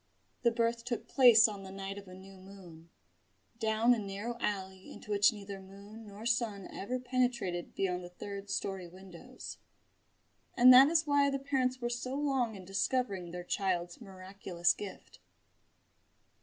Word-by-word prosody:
The 235 - +4
birth 230 0 0
took 240 -1 -4
place 235 -4 +7
on 205 -2 -7
the 190 - -9
night 195 +1 -6
of 200 - -14
a 185 - -11
new 190 +1 -13
moon, 185 -4 -14 0.7
down 220 +1 +3
a 235 - -1
narrow 205 +4 -5
alley 190 -3 -4
into 210 - -10
which 205 +1 +5
neither 200 -2 -8
moon 200 +3 -12
nor 205 +2 -10
sun 230 -5 -1
ever 245 +6 -3
penetrated 245 -8 -1
beyond 180 -2 -1
the 175 - -9
third 200 +2 -8
storey 195 -2 -3
windows 190 +7 -11 1.0
and 255 +1 +9
that 260 +2 +9
is 325 +1 +2
why 285 -1 +3
the 275 - -1
parents 265 -2 -1
were 240 - -1
so 245 +2 -4
long 270 -6 0
in 190 -2 -10
discovering 195 -1 -1
their 175 +1 -6
child's 175 0 -2
miraculous 185 -3 -2
gift. 200 -2 -10
205 Hz, 155 wpm, -32 LUFS, 190-245 Hz, 1.0 s, and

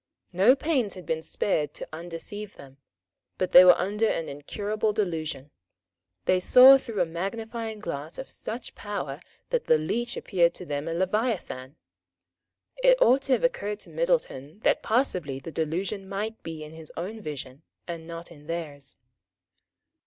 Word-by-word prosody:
No 200 +9 +6
pains 270 -8 0
had 180 -2 -10
been 160 +1 -1
spared 150 -4 -1
to - - -6
undeceive 175 +5 -6
them; 135 -1 -14 0.6
but 185 - -1
they 180 - +11
were 180 -1 +8
under 210 +4 0
an 165 - -1
incurable 210 +9 -2
delusion. 160 -8 -3 0.7
They 185 - +3
saw 260 +8 +9
through 230 -7 -3
a - - +3
magnifying 220 +6 -4
glass 160 -6 -6
of 265 - -6
such 235 +2 -7
power 205 -1 -5 0.3
that - - 0
the 160 - +5
leech 235 +10 -2
appeared 170 -3 +2
to 180 - -8
them 145 0 -3
a 165 - -2
leviathan. 185 - -1 1.0
It - - +5
ought 270 - +5
to 270 - +1
have - - +1
occurred 210 - 0
to - - -9
Middleton 220 - -1
that - - +2
possibly 180 - 0
the 135 +5 -8
delusion 190 +6 -2
might 210 +3 -4
be 160 -2 -7
in 150 - -10
his 160 -1 -9
own 205 +6 -5
vision 140 -4 -7 0.3
and 165 -2 -6
not 170 0 -8
in 150 -2 -15
theirs. 150 -5 -3
185 Hz, 160 wpm, -27 LUFS, 160-220 Hz, 1.0 s, they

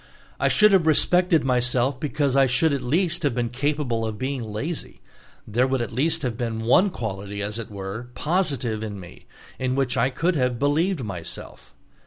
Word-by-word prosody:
I - - +2
should 210 0 +5
have 185 -5 +4
respected 175 +2 +4
myself 125 0 +1
because 145 -2 0
I 135 -1 +5
should 145 +5 +2
at 140 - -1
least 170 +6 0
have 145 -7 0
been 120 -1 -1
capable 130 -3 -1
of 110 -1 -3
being 130 +1 -3
lazy; 115 +9 -5 0.5
there 120 +5 +2
would 135 0 0
at 120 -3 -3
least 160 +6 +1
have 125 -3 -1
been 115 -1 -3
one 180 - +4
quality, 100 - -5
as 105 +3 -3
it 115 - -6
were, 100 +3 -6
positive 140 - -1
in 105 -2 -5
me, 90 -2 -13 0.3
in 130 0 -1
which 135 -2 0
I 125 +2 +3
could 165 +7 0
have 125 -3 0
believed 150 +4 +1
myself. 90 -6 -7
130 Hz, 185 wpm, -24 LUFS, 115-150 Hz, 0.5 s, should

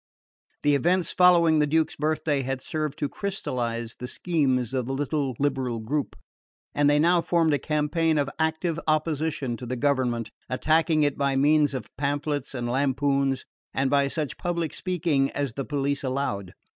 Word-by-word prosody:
The 145 - +4
events 175 +5 +2
following 170 -3 +5
the 150 - +3
Duke's 160 +1 +1
birthday 155 -1 0
had 135 0 -3
served 155 +1 -3
to 145 - -1
crystallise 120 - -3
the 125 - -5
schemes 130 -6 0
of 130 -2 -1
the 135 - -2
little 140 -2 -1
liberal 130 -4 -1
group, 135 +6 -2 0.6
and 145 0 +3
they 145 - +4
now 170 +3 +4
formed 165 -2 +2
a 145 - +1
campaign 155 +2 +1
of 145 -1 +1
active 160 +1 0
opposition 155 -4 0
to 125 - -8
the 130 - -2
government, 125 -4 0 0.2
attacking 155 +3 +2
it 145 -1 0
by 140 -1 +1
means 145 +1 +3
of 120 -5 -7
pamphlets 145 0 -2
and 120 -1 -3
lampoons, 135 +1 +1 0.3
and 130 0 +1
by 140 -1 +3
such 150 -1 -3
public 170 -3 -2
speaking 165 -7 0
as 140 -4 -2
the 135 +1 -4
police 140 -1 -1
allowed. 130 -9 -2
145 Hz, 165 wpm, -26 LUFS, 130-155 Hz, 0.6 s, following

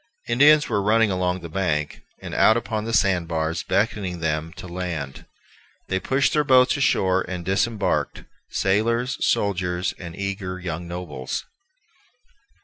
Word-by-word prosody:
Indians 145 +5 +5
were 105 -3 0
running 110 +1 +3
along 90 0 -1
the 85 - -7
beach, 80 -4 -2 0.2
and - - -6
out 110 - +5
upon 110 -1 -3
the 115 - -3
sand 95 -6 +2
bars, 80 0 -1
beckoning 100 -2 -1
them 80 0 -2
to 95 - -10
land. 85 -6 -5 0.6
They 95 - 0
pushed 135 +8 +1
their 150 - +3
boats 130 -1 +5
ashore 95 -9 +2
and 90 -2 -5
disembarked, 100 +3 0 0.3
sailors, 115 +6 0
soldiers, 90 -3 0
and 85 -1 -8
eager 100 -2 -4
young 85 -1 -5
nobles. 85 -7 -5
95 Hz, 140 wpm, -23 LUFS, 85-110 Hz, 0.6 s, Indians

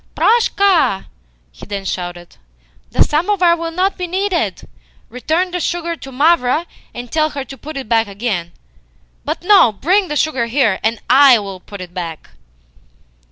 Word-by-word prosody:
"Proshka!" 395 - +2 0.5
he - - -13
then 200 -1 -5
shouted. 175 -2 -6 0.5
"The - - +3
samovar 350 +2 +2
will 335 0 -4
not 370 +4 -1
be 360 - -2
needed. 375 0 -2 0.4
Return 320 +9 -1
the 360 - -2
sugar 340 0 -2
to 270 -4 -11
Mavra, 295 +1 +2 0.3
and 240 0 -9
tell 310 -1 +1
her 285 -3 -5
to 270 +1 -10
put 290 +2 -9
it 265 - -6
back 225 0 +2
again. 200 -4 -3 0.7
But - - -3
no. 375 - +6
Bring 370 - +1
the 300 - -4
sugar 265 -5 0
here, 230 -6 +1
and 225 0 -1
I 265 -1 +7
will 195 -3 -6
put 200 +1 -11
it 180 -1 -9
back." 170 -4 -7
275 Hz, 160 wpm, -17 LUFS, 210-345 Hz, 0.7 s, I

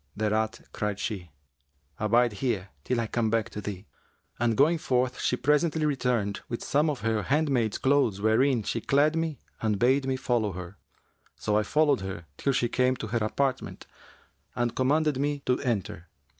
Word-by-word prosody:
Thereat 110 +2 0
cried 105 -2 -2
she, 95 -5 -4 0.7
'Abide 115 +2 +3
here 105 -4 -2
till 125 +6 0
I 115 - 0
come 110 0 0
back 115 0 0
to 105 - -5
thee;' 100 -1 -6 0.5
and 115 -2 +1
going 160 +4 +4
forth 125 -2 0
she - - +1
presently 150 +4 +2
returned 125 -8 0
with 120 - -4
some 150 +3 +2
of 145 -4 -3
her 110 -1 0
handmaid's 135 -3 +1
clothes 135 -7 +2
wherein 115 +3 +3
she 115 - -2
clad 145 +5 +3
me 165 -3 -1 0.2
and 110 -2 +1
bade 130 +5 +3
me 130 - +1
follow 120 -6 0
her; 90 +2 -8 0.6
so 105 - -1
I 105 - +4
followed 145 +2 +2
her 95 -3 -6
till 140 - +1
she 125 -2 +1
came 125 +2 +2
to 110 - -6
her 120 +2 0
apartment 130 +4 -2 0.7
and 120 -1 -1
commanded 145 +2 +2
me 145 0 -1
to 125 - +1
enter. 105 -7 -3
120 Hz, 170 wpm, -27 LUFS, 105-140 Hz, 0.7 s, going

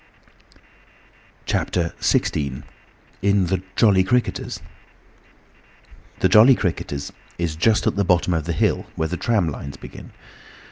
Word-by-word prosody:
CHAPTER 85 -2 -1
XVI. 70 -2 0 0.6
IN 100 -1 +2
THE 90 +1 -1
"JOLLY 100 -4 +4
CRICKETERS" 120 +6 -1 1.6
The - - +5
"Jolly 120 +5 +7
Cricketers" 80 -8 -3 0.2
is 85 -3 -2
just 105 +7 +2
at - - +1
the 100 - +2
bottom 90 -1 +2
of 80 -3 -1
the 85 - -2
hill, - - 0
where 80 0 -2
the 90 - -2
tram 105 -7 +1
lines 70 -1 -7
begin. - - -11
90 Hz, 125 wpm, -22 LUFS, 80-100 Hz, 1.6 s, Jolly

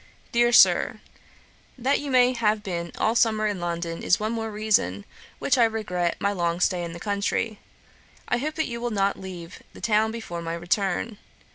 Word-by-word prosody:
'DEAR 240 0 +3
SIR, - - +5 0.8
'That 260 +3 +1
you 255 -3 +3
have 215 -3 +1
been 170 -3 -4
all 220 - +2
summer 220 -2 +2
in 205 -3 -1
London, 170 -1 -3
is 180 - +2
one 215 +1 -1
more 225 -1 -3
reason 210 - 0
for - - -28 0.3
which 260 -2 +1
I - - +7
regret 190 -6 -1
my 200 - +1
long 170 -3 -1
stay 180 -1 +1
in 170 -1 -5
the 170 - -8
country. 205 +2 -1 0.7
I - - +1
hope 305 +4 -3
that 315 0 0
you 235 -1 -5
will 240 - -1
not 200 -2 0
leave 180 -2 -9
the - - -12
town 220 0 +2
before 220 -7 -6
my 165 0 -3
return. 195 +4 -1
210 Hz, 185 wpm, -25 LUFS, 175-230 Hz, 0.8 s, I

